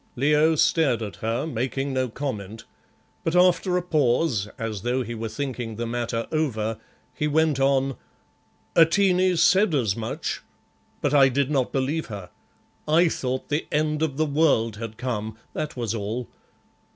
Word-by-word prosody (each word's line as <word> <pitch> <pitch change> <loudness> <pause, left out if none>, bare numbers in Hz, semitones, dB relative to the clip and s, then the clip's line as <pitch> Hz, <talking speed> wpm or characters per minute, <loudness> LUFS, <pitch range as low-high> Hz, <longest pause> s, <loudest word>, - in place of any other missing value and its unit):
Leo 150 +4 +3
stared 145 -7 +2
at 105 -2 -7
her, 115 +5 -2
making 135 0 -2
no 130 -1 0
comment, 110 -5 -5 0.6
but 165 - -1
after 180 0 +4
a 180 - -1
pause, 140 - +1
as 110 -3 -4
though 125 +3 0
he 120 0 -6
were 115 0 -4
thinking 120 -1 -4
the 120 +2 -3
matter 115 0 -2
over, 115 -8 -1 0.3
he 150 +4 -1
went 155 -2 +2
on 135 -1 +2 0.8
"Atene 180 +2 +4
said 185 +1 +4
as 110 -8 +1
much, 110 -1 -4 0.6
but 145 - 0
I 135 -2 +6
did 140 +2 0
not 135 -4 +1
believe 140 +4 -1
her. 100 -6 -8 0.6
I 165 +3 +4
thought 130 -3 -3
the 150 +2 -1
end 150 0 0
of 150 -4 -1
the 155 - +2
world 140 -8 +2
had 110 -1 -7
come, 110 -3 -3 0.2
that 150 -3 -4
was 115 -3 -2
all. 115 +3 -3
135 Hz, 155 wpm, -24 LUFS, 115-155 Hz, 0.8 s, I